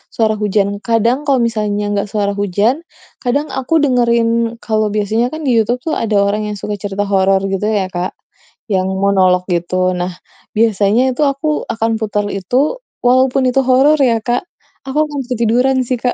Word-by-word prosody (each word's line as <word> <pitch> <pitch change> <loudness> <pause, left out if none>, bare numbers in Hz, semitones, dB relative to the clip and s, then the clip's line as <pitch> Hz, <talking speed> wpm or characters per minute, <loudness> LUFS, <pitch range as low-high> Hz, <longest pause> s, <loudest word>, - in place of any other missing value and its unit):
suara 220 -1 +2
hujan. 200 -1 0
Kadang 230 +2 +2
kalau 270 -3 +3
misalnya 210 -2 -2
nggak 205 0 -1
suara 205 -2 0
hujan, 205 +5 +1 0.5
kadang 280 +5 0
aku 265 +4 -3
dengerin 235 -3 +2
kalau 215 -1 0
biasanya 215 +3 +1
kan, 315 - -5
di 265 - +1
Youtube 245 +3 0
tuh 320 - -2
ada 215 -2 0
orang 210 +1 -1
yang 210 - -4
suka 205 +1 -4
cerita 205 0 -3
horor 195 0 +3
gitu 195 +2 -1
ya, 200 -4 -1
Kak, 180 0 -3 0.6
yang 185 -1 +1 0.2
monolog 185 -2 +3
gitu. 185 +2 0
Nah, 180 +1 -3 0.4
biasanya 215 0 +3
itu 255 - -4
aku 275 +3 -5 0.3
akan 225 0 -1
putar 210 -2 -1
itu, 255 - 0 0.3
walaupun 260 +2 +3
itu 270 +2 +1
horor 270 +4 +4
ya, 230 - +2
Kak, 245 +5 0 0.4
aku 265 - -4
akan 295 -2 -5
ketiduran 250 +3 +2
sih, 255 - 0
Kak. 245 +1 0
220 Hz, 170 wpm, -16 LUFS, 200-250 Hz, 0.6 s, horor